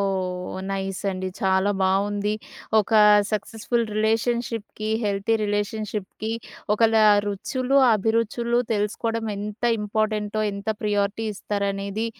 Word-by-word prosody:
ఓహ్! 185 -2 -2
నైసండి. 195 -1 -2
చాలా 190 0 +2
బావుంది. 200 +2 +1 0.5
ఒకా 215 +1 +3 0.3
సక్సెస్‌ఫుల్ 225 +3 -1
రిలేషన్‌షిప్‌కి, 225 0 -1 0.2
హెల్తీ 200 +2 +1
రిలేషన్‌షిప్‌కి, 210 +1 -3 0.4
ఒకళ్ళా 225 0 +4 0.2
రుచులు, 255 +7 0 0.2
అభిరుచులు 230 +3 +1
తెలుసుకోడం 225 +2 -1
ఎంత 210 +3 -6 0.2
ఇంపార్టెంటో, 215 0 -1
ఎంత 200 +2 -7
ప్రియారిటీ 205 +1 0
ఇస్తారనేది 200 +2 -2
210 Hz, 90 wpm, -24 LUFS, 200-225 Hz, 0.5 s, ఒకళ్ళా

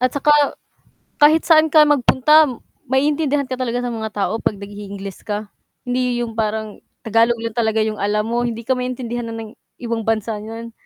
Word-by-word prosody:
At 255 +1 +1
'tsaka 295 +1 +2 0.9
kahit 310 +2 +5
saan 320 -1 +5
ka 310 0 +6
magpunta 295 +2 +4 0.4
maiintindihan 285 +2 +1
ka 260 -1 -5
talaga 245 0 -2
sa 245 - -2
mga 220 -1 -4
tao, 210 +2 -1
'pag 205 - -1
nag-iingles 200 -1 -8
ka 210 0 -4 0.3
hindi 245 -1 -1
yung 230 - -5
parang 215 -1 -3 0.2
Tagalog 230 +2 +3
lang 230 - -3
talaga 220 -1 +1
yung 215 -1 -3
alam 210 +1 0
mo, 240 +2 -1
hindi 230 0 -5
ka 255 - -3
maintindihan 240 -2 -4
ng 225 -1 -7 0.3
ibang 230 -2 -3
bansa 220 -1 -1
n'yan 225 +2 -8
230 Hz, 170 wpm, -20 LUFS, 220-255 Hz, 0.9 s, ka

